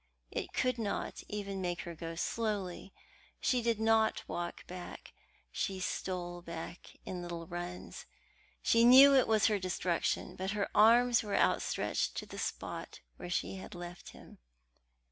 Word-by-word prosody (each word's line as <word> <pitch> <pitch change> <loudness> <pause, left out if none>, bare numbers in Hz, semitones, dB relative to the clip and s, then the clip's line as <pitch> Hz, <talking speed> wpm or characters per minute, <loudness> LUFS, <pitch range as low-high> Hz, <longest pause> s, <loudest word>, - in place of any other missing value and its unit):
It - - -4
could 255 -1 0
not 210 -3 -3
even 200 -2 -4
make 175 -1 -2
her 170 - -7
go 165 0 -6
slowly. 195 -1 -2 0.5
She 250 -2 +2
did 230 -2 +1
not 220 0 +2
walk 175 0 -4
back; 180 0 -9 0.4
she 190 -2 -2
stole 175 -1 -3
back 170 +1 -8
in 180 -1 -5
little 170 -1 -5
runs. 175 +1 -7 0.6
She 230 0 +4
knew 265 +4 +9
it 265 -3 +5
was 220 -2 +3
her 210 -2 +3
destruction, 180 -2 -1
but 190 +2 -3
her 200 - +1
arms 235 +3 +6
were 205 -2 -1
outstretched - - +1
to - - -4
the - - -8
spot - - -5 0.2
where 175 - -7
she 185 +2 -2
had 190 - -9
left 175 0 -8
him. - - -14
190 Hz, 150 wpm, -33 LUFS, 175-220 Hz, 0.6 s, knew